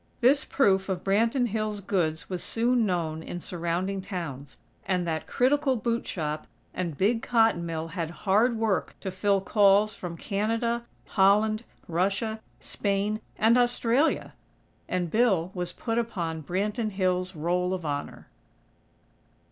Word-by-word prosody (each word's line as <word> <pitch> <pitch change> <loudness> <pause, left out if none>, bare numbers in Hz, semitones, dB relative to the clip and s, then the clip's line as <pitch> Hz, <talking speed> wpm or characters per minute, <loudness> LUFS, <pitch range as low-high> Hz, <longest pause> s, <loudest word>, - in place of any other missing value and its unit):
This 275 +4 +4
proof 195 -7 +2
of 185 -2 -2
Branton 230 +5 +2
Hills' 215 -1 -2
goods 175 -5 -1
was 180 -2 -4
soon 235 0 +1
known 165 -4 -1
in 175 - -6
surrounding 175 +3 -2
towns, 160 -8 -6 0.3
and 180 -2 0
that 160 -2 -2
critical 270 +1 +2
boot 235 0 -1
shop 155 -3 -3 0.3
and 170 -5 -3
big 225 +4 +2
cotton 225 -8 +2
mill 165 0 -3
had 165 -2 -3 0.2
hard 220 +5 +3
work 220 -4 0
to 190 - -3
fill 195 +1 +1
calls 205 +1 +4
from 175 -3 -7
Canada, 230 +4 -1 0.2
Holland, 215 +3 +3 0.2
Russia, 195 +6 0 0.2
Spain 205 +2 -1 0.2
and 230 +3 +5
Australia! 245 +4 +1 0.6
And 180 -3 -1
Bill 195 -7 +2
was 180 -2 -3
put 230 -1 -2
upon 170 -9 -3
Branton 205 - -1
Hills' 185 -2 -1
Roll 175 +3 0
of 185 -3 -3
Honor. 145 -1 -4
195 Hz, 135 wpm, -27 LUFS, 175-225 Hz, 0.6 s, and